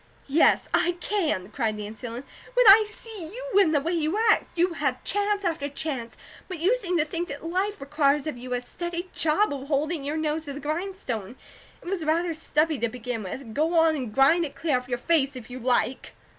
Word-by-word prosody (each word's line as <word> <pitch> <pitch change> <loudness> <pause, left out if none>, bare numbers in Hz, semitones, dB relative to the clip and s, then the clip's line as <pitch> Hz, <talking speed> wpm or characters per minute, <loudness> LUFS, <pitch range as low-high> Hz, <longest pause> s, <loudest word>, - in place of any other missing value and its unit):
"Yes, 290 +4 +3
I 350 - +3
can," 300 - -1
cried 225 -5 -1
Nancy 215 +3 -7
Ellen, 235 +3 -6 0.3
"when - - +5
I 425 +2 +9
see 425 -3 -4
you, - - 0
and 340 -5 +3
the - - +5
way 320 +5 -2
you 330 +2 0
act! - - 0
You 350 +1 +2
have 275 -5 -1
chance 410 0 0
after 315 -4 -1
chance, 270 -6 -4 0.3
but 370 - -5
you 365 +10 +3
seem 365 -8 -1
to 305 - +2
think 335 +3 -3
that 285 -2 -7
life 380 +5 -1
requires 285 0 +1
of 310 - -3
you 250 +1 -9
a 245 - -1
steady 345 +6 -5
job 320 +3 +2
of 275 -1 -6
holding 300 +1 0
your 295 +3 -2
nose 315 0 -1
to 285 - -5
the 285 - -7
grindstone. 295 - -4 0.5
It - - -12
was 365 -2 -2
rather 330 +2 +1
stubby 310 -1 0
to 235 +1 0
begin 245 -1 -5
with, 220 +4 -7
go 315 +6 +1
on 325 -1 +4
and 255 -7 -4
grind 275 +9 +4
it 295 - -5
clear 295 -6 +1
off 250 - -13
your 245 - 0
face, 280 0 +1
if 245 -1 -9
you 255 - -6
like." 245 0 0
305 Hz, 215 wpm, -26 LUFS, 255-345 Hz, 0.5 s, I